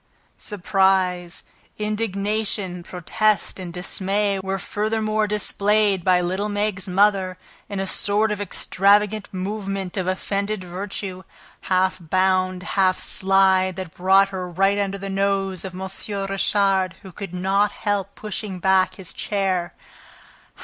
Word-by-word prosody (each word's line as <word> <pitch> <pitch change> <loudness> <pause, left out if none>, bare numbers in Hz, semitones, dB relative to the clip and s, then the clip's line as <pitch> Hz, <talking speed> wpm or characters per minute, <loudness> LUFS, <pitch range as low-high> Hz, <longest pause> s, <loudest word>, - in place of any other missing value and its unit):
Surprise, 190 -3 +1 0.3
indignation, 210 -3 -2
protest 205 +5 0
and 180 -2 -6
dismay 195 +3 -1
were 190 0 -2
furthermore 215 +2 -1
displayed 205 -1 +2
by 180 0 +4
little 185 +4 -1
Meg's 205 -2 -1
mother 190 -1 +2 0.3
in 200 -2 -3
a 195 - -1
sort 205 +3 +1
of 205 -1 -2
extravagant 205 +2 +2
movement 195 0 -4
of 185 -1 -1
offended 200 +2 -2
virtue, 185 +1 -5 0.5
half 185 0 +2
bound, 185 +1 +1
half 185 0 +2
slide, 190 -1 +3
that 185 -3 -6
brought 195 +2 +4
her 185 -2 -5
right 195 +3 +2
under 200 -1 -1
the 195 0 -6
nose 195 -1 0
of 190 -2 -7
M. 190 +1 -4 0.4
Richard, 195 -2 +1
who 190 - -10
could 190 -1 -7
not 195 +3 +2
help 200 -1 -2
pushing 210 -2 -5
back 190 +1 +3
his 185 -4 -9
chair. 190 -4 -1
195 Hz, 125 wpm, -23 LUFS, 185-205 Hz, 0.5 s, by